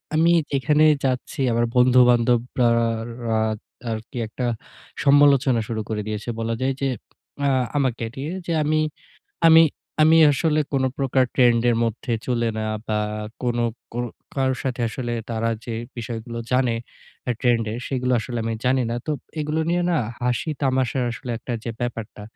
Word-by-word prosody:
আমি 165 +2 +4 0.2
যেখানে 150 +3 +3 0.2
যাচ্ছি 130 +1 -2
আমার 120 +1 +2
বন্ধু-বান্ধবরা 125 -1 +4 0.6
রা 110 -1 +1 0.5
আরকি 110 +2 -6
একটা 125 +3 -4 0.6
সমালোচনা 140 -3 +5
শুরু 110 -2 -2
করে 105 -1 -1
দিয়েছে। 105 +2 -4
বলা 115 0 -1
যায় 135 +1 +1
যে 135 - +1 0.6
আ - - +3 0.3
আমাকে 125 -4 0
নিয়ে 145 +5 -4
যে, 170 - -3
আমি 155 +1 +2 0.7
আমি 165 0 +9 0.4
আমি 160 +1 +6 0.2
আসলে 155 +2 +1
কোনো 130 -1 +2
প্রকার 130 -1 +2
ট্রেন্ড 120 -3 +4
এর 115 - +1
মধ্যে 115 +2 -3
চলে 120 -2 +1
না 110 - -2 0.2
বা 105 -1 0 0.4
কোনো 120 -1 0 0.3
কো 120 - -5 0.4
কারোর 130 -1 0
সাথে 125 -2 -2
আসলে 120 +1 -4 0.2
তারা 115 0 0
যে 115 - -4 0.2
বিষয়গুলো 115 0 -5
জানে 125 -2 +2 0.5
আ - - +2
ট্রেন্ড 120 -3 +2
এর, 115 - -4
সেগুলো 125 -1 -1
আসলে 120 +1 -4
আমি 115 0 -1
জানি 130 0 +3
না। 120 - -1
তো 155 - 0 0.3
এগুলো 150 +1 -1
নিয়ে 175 0 +1
না 170 - +2 0.3
হাসি, 125 +5 0
তামাশার 130 -1 +1
আসলে 120 +1 -7
একটা 125 - -6
যে 115 - -2
ব্যাপারটা 115 -3 -5
125 Hz, 155 wpm, -23 LUFS, 115-135 Hz, 0.7 s, আমি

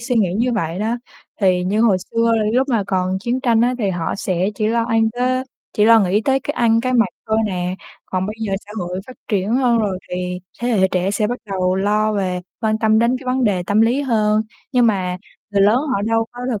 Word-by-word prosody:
suy 245 +1 -1
nghĩ 190 -5 +2
như 240 +4 +1
vậy 170 -5 -2
đó, 225 +3 -1 0.4
thì 180 -2 +2
như 205 +4 0
hồi 220 -5 +4
xưa 230 +4 0 0.2
lúc 260 +3 +2
mà 225 -6 +1
còn 185 0 0
chiến 245 +4 -1
tranh 235 -4 +2
á 245 +2 +2
thì 200 -4 0
họ 170 -3 -2
sẽ 185 0 -1
chỉ 215 - -1
lo 230 0 +1
ăn 225 -2 +2
tới 255 +1 0 0.3
chỉ 210 - +2
lo 225 0 +7
nghĩ 200 +2 +2
tới 270 0 +2
cái 290 - -3
ăn, 230 -1 +3
cái 255 +1 -1
mặc 230 -4 +4 0.2
thôi 220 0 +1
nè, 180 -2 -2 0.3
còn 185 0 -2
bây 215 - -4
giờ 210 -3 -2
xã 210 - -11
hội 180 +1 -4
phát 255 - -11
triển 205 +1 0
hơn 245 -3 +3
rồi 200 -4 -1
thì 180 0 -3 0.2
thế 240 - -1
hệ 190 -5 +3
trẻ 185 +1 0
sẽ 210 +1 0
bắt 245 +3 -3
đầu 185 -1 0
lo 210 +2 +1
về 185 -3 -1 0.2
quan 220 -2 0
tâm 220 0 +3
đến 235 +3 +2
cái 265 - -13
vấn 255 0 +1
đề 190 -5 +1
tâm 205 +3 +2
lý 235 +5 +3
hơn. 215 -4 +2 0.3
Nhưng 245 -2 +4
mà 185 -4 0 0.3
người 200 -1 +2
lớn 210 +3 +5
họ 260 -9 -1
đâu 225 +1 +1
có 245 - -10
thực 220 -5 -2
215 Hz, 240 wpm, -19 LUFS, 190-235 Hz, 0.4 s, lo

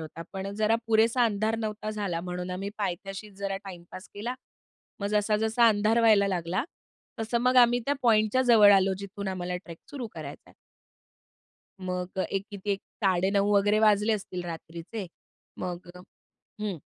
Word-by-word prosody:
होता. 160 +1 -8
पण 195 0 -4
जरा 215 +1 +2
पुरेसा 225 +2 +4
अंधार 220 +1 0
नव्हता 215 -1 -4
झाला 200 -6 -2
म्हणून 180 +1 -5
आम्ही 195 +2 -4
पायथ्याशीच 195 +1 -4
जरा 195 -1 -2
टाइम 180 -3 -9
पास 185 - -9
केला, 225 +5 -4 0.7
मग 200 - -1
जसा 210 0 +2
जसा 220 +2 +3
अंधार 215 +1 +3
व्हायला 215 -3 +5
लागला, 180 +2 -1 0.6
तसं 225 +2 0
मग 255 +1 +2
आम्ही 245 -1 +6
त्या 285 - +2
पॉइंटच्या 220 +1 +3
जवळ 225 -5 +7
आलो 195 0 +4
जिथून 200 0 -6
आम्हाला 180 -1 -3
ट्रेक 170 -2 -9
सुरू 260 -5 -5
करायचा - - -9
आहे. - - -20 1.3
मग 180 0 -4
एक 195 0 -1
किती 205 0 -5
एक 195 - -3 0.2
9:30 195 +2 +2
वगैरे 205 +1 +3
वाजले 210 0 +4
असतील 185 -3 -4
रात्रीचे. 170 +4 -7 0.5
मग 180 -1 -5 0.7
हं. 200 -7 -3
200 Hz, 155 wpm, -28 LUFS, 185-220 Hz, 1.3 s, जवळ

